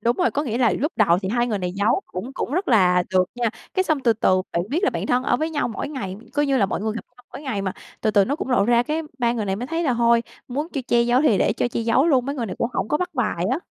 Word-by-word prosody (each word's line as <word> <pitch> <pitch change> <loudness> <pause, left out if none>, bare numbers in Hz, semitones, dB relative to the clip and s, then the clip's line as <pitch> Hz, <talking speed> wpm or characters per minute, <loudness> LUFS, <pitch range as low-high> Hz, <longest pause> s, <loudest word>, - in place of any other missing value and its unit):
Đúng 235 +3 +1
rồi, 360 - +2
có 290 - -1
nghĩa 235 -5 -2
là 235 -5 +3
lúc 295 - -1
đầu 180 -5 +4
thì 190 - -2
hai 240 +2 +1
người 215 -4 -1
này 180 -1 -3
giấu, 200 +3 +1
cũng 220 +9 -6
cũng 270 - -4
rất 365 +5 -1
là 180 -6 +4
được 185 -1 +4
nha. 240 -2 0 0.2
Cái 375 - +3
xong 315 -6 0
từ 235 -3 +3
từ 185 -4 +2
bạn 170 - 0
biết 345 +7 +1
là - - +3
bạn - - -3
thân 245 +1 +2
ở 250 -2 +1
với 315 +5 -2
nhau 300 -5 -1
mỗi 230 - -4
ngày, 200 -11 -5 0.2
coi 290 0 +1
như 275 -1 +2
là 200 - +3
mọi - - -3
người 215 +1 -1
gặp 230 - -6
nhau 245 - -20
mỗi 290 - -8
ngày 220 -8 -3
mà, 190 - -2 0.3
từ 220 - +1
từ 200 -2 +4
nó 280 +8 -1
cũng 265 - -4
lộ 235 -6 +3
ra, 235 +1 +4
cái 305 +5 -2 0.2
ba 235 -2 +2
người 230 -3 -2
này 195 -1 -1
mới 245 - -4
thấy 330 +4 -2
là 260 - +2
hôi, 235 0 +3 0.3
muốn 290 +6 -3
chiêu 280 -6 -4
che 240 0 +4
giấu 245 +3 +3
thì 225 -10 +4
để - - +2
cho 235 - -1
che 240 - -3
giấu 230 +6 +3
luôn, 265 -6 +3
mấy 280 - -2
người 240 -5 -3
này 190 - -6
cũng 230 - 0
hổng 225 - -2
có - - +2
bắt 360 +2 -4
bài 210 -8 -1
á, 265 - +1
240 Hz, 330 wpm, -22 LUFS, 210-280 Hz, 0.3 s, đầu